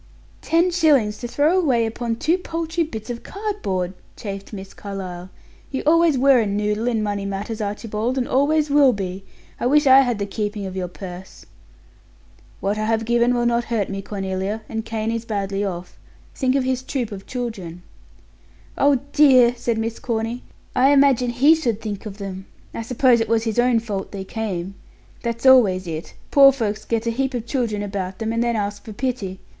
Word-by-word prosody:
"Ten 340 +2 +2
shillings 285 -12 +3
to 240 - -4
throw 300 +9 +2
away 255 -9 +2
upon 230 +1 -3
two 325 +10 +1
paltry 330 -1 -2
bits 225 -6 -6
of 235 - -6
cardboard!" 390 - -3 0.2
chafed 200 -2 -7
Miss 195 -2 -8
Carlyle. 185 -3 -7 0.4
"You 265 - -3
always 330 -1 +4
were 270 0 +5
a 220 - +1
noodle 210 +3 -1
in 225 -3 +1
money 205 -1 -2
matters, 200 +3 -4
Archibald, 215 +4 -2
and 250 - 0
always 295 +2 +2
will 280 -3 +6
be. 190 -2 -5 0.4
I - - 0
wish 295 +3 +4
I 265 0 +8
had 245 -4 0
the 200 - -2
keeping 205 0 -3
of 190 -1 -6
your 185 -1 -2
purse!" 180 +1 -10 1.2
"What 205 +2 -1
I 215 - 0
have 225 0 0
given 240 +1 +2
will 240 0 +1
not 240 0 +1
hurt 225 -4 -1
me, 195 0 -4
Cornelia, 195 +2 -3
and 220 0 -4
Kane 225 0 -2
is 230 0 -2
badly 200 -3 -2
off. 180 -3 -5 0.3
Think 260 -1 0
of 275 - +2
his 255 0 -1
troop 260 -4 -3
of 195 -1 -8
children." 195 -9 -5 1.0
"Oh, 280 -3 +4
dear!" 255 -5 +6
said 235 -1 -1
Miss 225 +1 -3
Corny. 230 +1 -2 0.3
"I 260 +2 +5
imagine 275 -3 +4
he 265 +6 +5
should 245 -10 -1
think 210 -2 -5
of 200 -1 -8
them. 190 -2 -7 0.3
I - - -4
suppose 245 +1 +3
it 225 - -2
was 225 -1 +2
his 225 0 -1
own 245 -1 +4
fault 205 -4 -5
they 195 -2 -5
came. 195 -3 -4 0.5
That's 235 +1 -4
always 210 -8 +6
it. 160 -1 -6 0.2
Poor 275 -1 +8
folks 220 -6 -3
get 230 0 -1
a 230 - +1
heap 265 +2 -1
of 235 -2 -3
children 230 -5 -1
about 195 -2 -4
them, 225 0 -2
and 230 +1 +1
then 235 -1 0
ask 205 -1 -3
for 220 - -9
pity. 205 -6 -3
225 Hz, 190 wpm, -22 LUFS, 200-255 Hz, 1.2 s, I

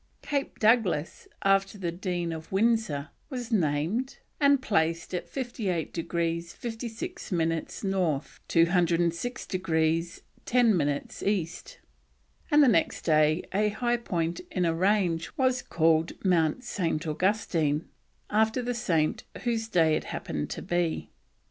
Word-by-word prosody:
Cape 280 -1 -2
Douglas, 210 -9 +2 0.2
after 195 +1 +2
the 175 -4 -2
Dean 175 -1 -2
of 160 -1 -8
Windsor, 195 -8 +1 0.2
was 250 -4 -5
named, 175 - 0 0.2
and 280 -2 +5
placed 165 -7 0
in 180 - 0
58 220 - -3
degrees 170 0 -2
56 235 - -6
minutes 165 0 -1
North, 180 -7 -1
206 170 +5 +2
degrees 165 -2 0 0.2
10 235 -4 +4
minutes 145 -4 -2
East; 195 - -2 0.7
and 300 -2 +6
the - - +6
next 185 -9 +2
day 155 0 +3
a 210 +2 +2
high 240 +3 0
point 170 -7 -2
in 180 -2 0
a 165 - +2
range 180 -2 +1
was 260 -1 +2
called 160 0 +2
Mount 175 +5 +2
St. 165 -8 -2
Augustine, 160 -3 0 0.4
after 220 +4 +2
the 245 +1 -1
saint 170 -11 0 0.2
whose 230 -2 0
day 165 -7 +3
it - - -3
happened 75 -1 -4
to - - -5
be. 175 -2 -1
180 Hz, 130 wpm, -28 LUFS, 165-225 Hz, 0.7 s, and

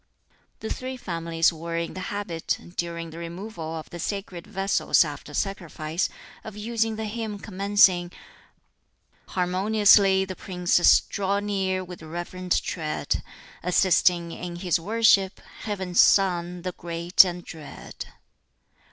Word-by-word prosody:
The 220 - -4
Three 260 0 -6
Families 165 -5 0
were 165 +1 -5
in 170 0 -3
the 185 - -6
habit, 185 -3 -3 0.2
during 170 -1 -4
the 165 - -9
Removal 170 -1 -6
of 160 - -7
the 175 - -7
sacred 195 0 -5
vessels 195 -1 +2
after - - -8
sacrifice, 170 -4 -2 0.3
of 215 -1 -9
using 225 +1 -1
the 220 0 -4
hymn 215 -1 -4
commencing, 195 -3 +3 1.2
"Harmoniously 195 +1 +4
the 185 -1 -6
Princes 180 -2 +3
Draw 200 0 -1
near 190 -2 -1
with 180 -1 -10
reverent 175 +3 -2
tread, 155 -3 -2 0.4
Assisting 180 -1 +3
in 175 +1 -6
his 175 -1 0
worship 200 0 +3 0.3
Heaven's 190 -4 -2
Son, 180 -2 +2
the 185 - -2
great 170 +1 +4
and 180 -2 -5
dread." 155 -3 -9
185 Hz, 125 wpm, -25 LUFS, 170-200 Hz, 1.2 s, Harmoniously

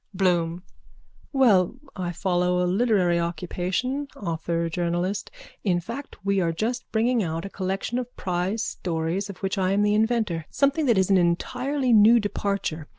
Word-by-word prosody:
BLOOM: 175 -2 +1 0.7
Well, 230 -8 +4 0.2
I 180 -2 -3
follow 180 0 +1
a - - +2
literary 185 -3 +2
occupation, 180 - -2
author 170 -2 -2
journalist. 175 +3 -2 0.3
In 180 -4 +2
fact 235 +2 -8
we 200 0 +2
are 170 -2 +1
just 230 +9 -3
bringing 235 +2 +2
out 165 -1 -3
a 195 - -7
collection 195 +5 -2
of 245 0 -7
prize 185 +5 -1
stories 170 +3 -2
of 195 - -7
which 195 +1 -1
I 185 0 +2
am 205 +1 +2
the 210 0 +3
inventor, 215 -7 0
something 280 +2 +1
that 235 -4 +4
is 190 +1 +2
an 190 - +6
entirely 250 +10 0
new 220 +2 +7
departure. 200 -7 -2
190 Hz, 155 wpm, -25 LUFS, 175-225 Hz, 0.7 s, new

